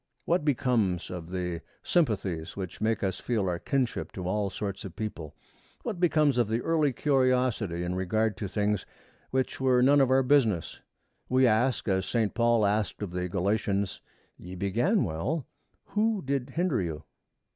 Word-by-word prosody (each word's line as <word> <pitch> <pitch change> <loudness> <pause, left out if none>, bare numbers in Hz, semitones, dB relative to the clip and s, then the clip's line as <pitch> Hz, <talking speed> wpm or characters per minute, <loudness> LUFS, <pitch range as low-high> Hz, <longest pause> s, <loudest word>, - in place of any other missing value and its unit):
What 170 -2 +2
becomes 120 - +1
of 85 -2 -6
the 90 -2 -3 0.2
sympathies 100 - 0
which 95 -3 -6
make 110 0 0
us 95 -1 -1
feel 110 -6 -1
our 85 -1 -1
kinship 130 +2 -1
to 90 -2 -5
all 100 +1 0
sorts 100 0 -5
of 95 - -8
people? 85 -9 -5 0.5
What 215 -7 -4
becomes 150 -6 +3
of 120 - +3
the 110 +2 0
early 155 -2 +2
curiosity 125 - +1
in 90 +1 -2
regard 105 +4 0
to 100 - -3
things 105 +1 0 0.5
which 130 0 -1
were 125 -2 +4
none 140 +2 +6
of 135 - +3
our 135 0 +4
business? 120 - +2 0.5
We 130 +1 +4
ask 120 +3 +2
as 95 -1 +1
Saint 115 -4 0
Paul 115 -2 +3
asked 105 +1 0
of 95 - -4
the 90 0 -3
Galatians, 100 +1 -1 0.4
'Ye 90 +1 -9
began 120 - +1
well; 115 - -2 0.4
who 215 -1 0
did 135 -1 -1
hinder 165 - 0
you?' 80 -3 -4
110 Hz, 165 wpm, -28 LUFS, 95-130 Hz, 0.5 s, none